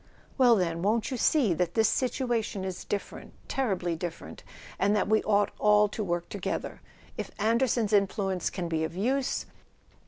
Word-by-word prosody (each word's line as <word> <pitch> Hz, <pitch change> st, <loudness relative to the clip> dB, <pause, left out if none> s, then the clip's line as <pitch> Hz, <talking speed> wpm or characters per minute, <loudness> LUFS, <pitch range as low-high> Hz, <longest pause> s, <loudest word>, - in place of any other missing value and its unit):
"Well, 245 Hz, -3 st, +6 dB
then—won't 190 Hz, +6 st, 0 dB
you 255 Hz, -, -2 dB
see 240 Hz, -, +3 dB
that 175 Hz, +1 st, -1 dB
this 220 Hz, -1 st, +4 dB
situation 240 Hz, -6 st, -1 dB
is 185 Hz, -1 st, -5 dB
different, 200 Hz, -, -5 dB
terribly 190 Hz, -10 st, -1 dB
different, 165 Hz, 0 st, -7 dB, 0.4 s
and 205 Hz, +1 st, +3 dB
that 205 Hz, -, +1 dB
we 215 Hz, +1 st, +3 dB
ought 205 Hz, -1 st, +2 dB
all 210 Hz, 0 st, +5 dB
to 215 Hz, -, -4 dB
work 175 Hz, -2 st, -2 dB
together? 200 Hz, -3 st, -4 dB, 0.4 s
If -, -, -3 dB
Anderson's 225 Hz, 0 st, +1 dB
influence 195 Hz, -2 st, +1 dB
can 180 Hz, -3 st, -4 dB
be 160 Hz, -1 st, -1 dB
of 160 Hz, -, -4 dB
use.. 255 Hz, +7 st, 0 dB
205 Hz, 155 wpm, -28 LUFS, 180-230 Hz, 0.4 s, Well